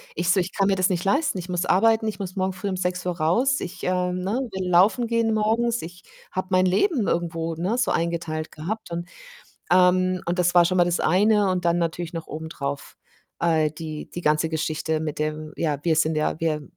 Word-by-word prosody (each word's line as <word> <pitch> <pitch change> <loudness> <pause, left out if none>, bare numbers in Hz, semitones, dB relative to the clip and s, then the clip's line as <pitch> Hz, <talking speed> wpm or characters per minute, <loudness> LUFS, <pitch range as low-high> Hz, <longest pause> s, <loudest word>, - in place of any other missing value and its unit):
ich 170 +2 -1
so: 190 - +3
„Ich 180 - -4
kann 195 -1 +1
mir 195 - +3
das 185 0 +2
nicht 180 0 -1
leisten. 280 +1 +1
Ich 180 - -6
muss 180 0 -1
arbeiten. 220 +3 +3
Ich 205 - -7
muss 185 -1 -5
morgen 190 0 0
früh 185 +2 -6
um 190 - -1
6 180 0 -2
Uhr 180 -1 -2
raus. 240 - +2
Ich, - - -7
ähm, 180 0 0
ne, 190 +3 -2 0.2
will 190 -1 -3
laufen 200 +7 +4
gehen 230 -1 +1
morgens.“ 225 +2 +1
Ich 175 +1 -10 0.3
habe 185 0 -3
mein 185 0 +4
Leben 235 - +2
irgendwo, 165 -1 -1
ne, 190 +9 -1
so 245 - +1
eingeteilt 165 -2 -2
gehabt. 190 +5 -5
Und, 170 +1 -4 0.6
ähm 185 0 +3
und 175 +1 -2
das 180 0 +2
war 175 - +7
schon 185 +1 +1
mal 175 - +6
das 175 0 0
eine 205 +3 +3
und 180 -2 -1
dann 170 0 +3
natürlich 170 +1 -2
noch 165 -1 -5
obendrauf, 145 -3 -6 0.4
äh, 160 -3 +2
die 155 0 -7
die 175 - -7
ganze 155 +1 +2
Geschichte 155 0 -2
mit 155 -2 -4
dem 155 0 -3
„Ja, 150 -3 0
wir 165 -2 +2
sind 160 -1 +2
ja 155 +1 -1
wir 155 -2 0
180 Hz, 220 wpm, -24 LUFS, 165-190 Hz, 0.6 s, war